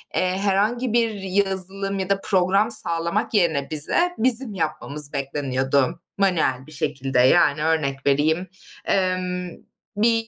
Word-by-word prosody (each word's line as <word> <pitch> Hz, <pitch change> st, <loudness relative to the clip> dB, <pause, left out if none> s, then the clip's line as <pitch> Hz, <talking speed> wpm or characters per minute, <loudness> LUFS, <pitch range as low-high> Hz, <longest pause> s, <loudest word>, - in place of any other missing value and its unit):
eee, 185 Hz, 0 st, 0 dB
herhangi 210 Hz, +5 st, 0 dB
bir 235 Hz, -1 st, +2 dB
yazılım 195 Hz, 0 st, 0 dB
ya 190 Hz, 0 st, -3 dB
da 195 Hz, 0 st, +1 dB
program 195 Hz, +3 st, +1 dB
sağlamak 170 Hz, +1 st, +1 dB
yerine 160 Hz, -8 st, +1 dB
bize, 345 Hz, -, +2 dB
bizim 245 Hz, -2 st, +2 dB
yapmamız 150 Hz, -3 st, -3 dB
bekleniyordu 135 Hz, -1 st, -1 dB, 0.2 s
manuel 155 Hz, -9 st, 0 dB
bir -, -, -13 dB
şekilde. 135 Hz, -4 st, -2 dB
Yani, 145 Hz, +3 st, +4 dB
örnek 140 Hz, -4 st, -1 dB
vereyim, 155 Hz, +6 st, +1 dB, 0.4 s
emm, 185 Hz, -1 st, -1 dB, 0.5 s
bir 225 Hz, +1 st, +2 dB
180 Hz, 125 wpm, -22 LUFS, 145-200 Hz, 0.5 s, Yani